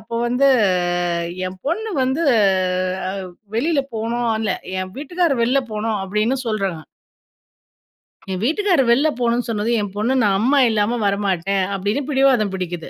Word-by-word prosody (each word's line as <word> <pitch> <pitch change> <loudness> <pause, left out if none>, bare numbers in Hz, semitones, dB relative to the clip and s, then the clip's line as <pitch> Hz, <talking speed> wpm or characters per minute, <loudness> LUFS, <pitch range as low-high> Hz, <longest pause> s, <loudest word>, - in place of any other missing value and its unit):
அப்போ 230 +2 -9
வந்து 255 +3 +2 1.0
என் 185 0 -11
பொண்ணு 435 +8 -1
வந்து 265 +6 0 0.9
அ - - -2 0.5
வெளில 295 +3 +1 0.2
போணும்னு 230 0 -1
இல்ல 200 -4 0 0.3
என் 185 0 -6
வீட்டுக்காரர் 305 -3 0
"வெளில 255 +4 +2
போணும்." 215 0 -1
அப்பிடின்னு 215 +7 0
சொல்றாங்க. 195 -6 -2 1.5
என் 185 +1 -3
வீட்டுக்காரு 350 -1 +2
வெளில 270 +6 +4
போணுனு 240 0 +1
சொன்னது 215 0 -1
என் 200 -1 -5
பொண்ணு 220 +5 0
"நான் 195 -2 +3
அம்மா 265 +6 +2
இல்லாம 220 +2 +1
வரமாட்டேன்." 195 -1 0
அப்பிடின்னு 210 +9 -2
பிடிவாதம் 265 -7 +3
பிடிக்கிது. 175 -3 -5
230 Hz, 135 wpm, -20 LUFS, 200-270 Hz, 1.5 s, வெளில